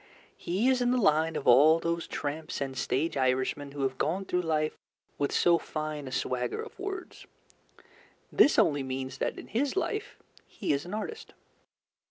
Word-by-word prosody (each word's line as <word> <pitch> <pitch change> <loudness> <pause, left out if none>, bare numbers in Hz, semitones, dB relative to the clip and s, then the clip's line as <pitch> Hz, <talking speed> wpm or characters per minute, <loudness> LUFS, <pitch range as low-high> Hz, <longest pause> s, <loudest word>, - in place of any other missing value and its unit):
He 190 +8 -1
is 260 -1 +3
in 245 - +2
the 250 - +2
line 160 -6 +3
of - - -3
all 145 +6 +7
those 170 0 -2
tramps 155 +2 -4
and 135 -1 -3
stage 150 +5 -1
Irishmen 130 +2 0
who 140 -1 -3
have 130 -1 -1
gone 180 +6 0
through! 180 -1 0
life 155 -2 0 0.4
with 140 -1 0
so 170 -1 +4
fine 155 -2 -5
a - - -6
swagger 125 -1 -2
of - - -8
words. 390 -2 -6 1.0
This 295 - +5
only 155 - +3
means 130 0 -5
that - - -1
in - - -8
his 270 +7 0
life 420 +2 -2 0.3
he - - -2
is 140 +3 -2
an 180 +4 -5
artist. 445 - -6
155 Hz, 175 wpm, -29 LUFS, 140-195 Hz, 1.0 s, all